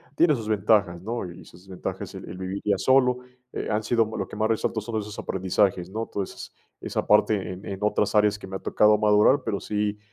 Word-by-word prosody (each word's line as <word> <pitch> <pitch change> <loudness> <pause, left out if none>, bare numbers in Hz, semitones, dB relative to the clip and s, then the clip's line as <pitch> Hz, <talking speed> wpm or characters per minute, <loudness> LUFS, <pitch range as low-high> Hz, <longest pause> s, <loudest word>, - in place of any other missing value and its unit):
Tiene 160 0 +4
sus 115 -6 -4
ventajas, 100 -4 +2
¿no? 110 -1 -4
Y 85 - -11
sus 90 - -16
desventajas, 95 -2 -6
el - - -9
el - - -7
vivir 95 +1 -4
ya 100 -2 +2
solo, 125 +2 +3 0.3
eh, - - -4
han 105 +1 0
sido 115 +1 +2
lo 100 - -2
que 105 - -10
más 110 +1 +2
resalto 110 0 0
son 110 +1 -4
esos 105 0 -8
aprendizajes, 95 -1 0
¿no?, 110 +3 -3
Toda 100 - -3
esas - - -10 0.3
esa - - -3
parte 105 +1 +4 0.2
en 95 +2 -9
en 95 -1 -5
otras 105 0 +1
áreas 105 -1 +3
que 95 - -9
me 95 - -7
ha - - -3
tocado 105 0 +3
madurar, 105 +6 +4
pero 110 -4 -2
sí, 105 0 -2
105 Hz, 225 wpm, -25 LUFS, 95-110 Hz, 0.3 s, Tiene